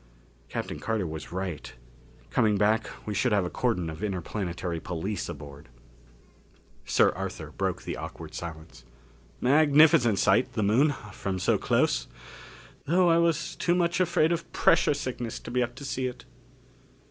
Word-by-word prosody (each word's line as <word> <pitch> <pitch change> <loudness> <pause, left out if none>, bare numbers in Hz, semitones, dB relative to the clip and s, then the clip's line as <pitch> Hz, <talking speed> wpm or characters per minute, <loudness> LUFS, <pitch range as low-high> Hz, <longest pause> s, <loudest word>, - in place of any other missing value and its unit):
Captain - - -4
Carter 110 -4 -1
was 80 -1 -6
right. 90 -4 -5 0.6
Coming 105 -2 +3
back 110 +2 +2 0.2
we 105 - -3
should 100 +5 +1
have 100 -3 +2
a 90 - -4
cordon 110 -9 0
of 80 +5 -6
Interplanetary 90 -3 -3
Police 95 +5 -4
aboard. 70 0 -10 1.2
Sir - - +4
Arthur - - -6
broke - - -2
the - - -4
awkward - - -8
silence. 80 -6 -8 0.6
"Magnificent 145 - +5
sight, 100 +5 +3
the 110 -3 0
Moon, 135 +8 +3 0.2
from 95 -1 -3
so - - +1
close - - +1 0.8
though 175 +2 +4
I 165 - +4
was 170 0 0
too 175 - +1
much 175 0 +1
afraid 170 -2 +3
of 170 -1 -3
pressure 145 - +3
sickness 125 -4 -4
to - - -8
be 125 0 +1
up 120 0 -2
to 140 - -8
see 130 -1 -2
it." 125 - -8
110 Hz, 150 wpm, -27 LUFS, 90-145 Hz, 1.2 s, Magnificent